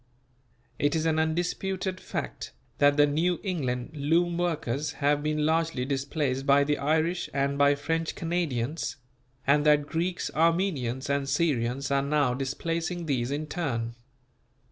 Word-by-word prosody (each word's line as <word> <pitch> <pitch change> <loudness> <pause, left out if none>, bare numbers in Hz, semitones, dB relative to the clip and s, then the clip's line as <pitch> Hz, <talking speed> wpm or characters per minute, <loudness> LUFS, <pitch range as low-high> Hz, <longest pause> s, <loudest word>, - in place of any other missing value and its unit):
It 145 +2 +2
is 160 0 0
an 160 -1 +2
undisputed 180 +3 -1
fact - - -5 0.3
that 145 0 +5
the 145 - +7
New 165 +5 +1
England 130 - -2
loom 165 +4 +2
workers 155 -5 -1
have 145 0 +1
been 150 0 0
largely 160 -4 +1
displaced 135 0 -1
by 140 0 +6
the 145 +1 0
Irish 160 +4 0
and 140 0 +1
by 145 0 +4
French 165 +3 -2
Canadians; 160 -4 -2 0.5
and 145 +1 +4
that 150 -1 +5
Greeks, 170 +4 -2
Armenians 160 -7 +1
and 140 -1 0
Syrians 140 -3 0
are 140 0 +3
now 140 -2 +1
displacing 165 +6 -2
these 130 -5 0
in 145 +2 -2
turn. 120 -8 -2
150 Hz, 140 wpm, -27 LUFS, 140-165 Hz, 0.5 s, the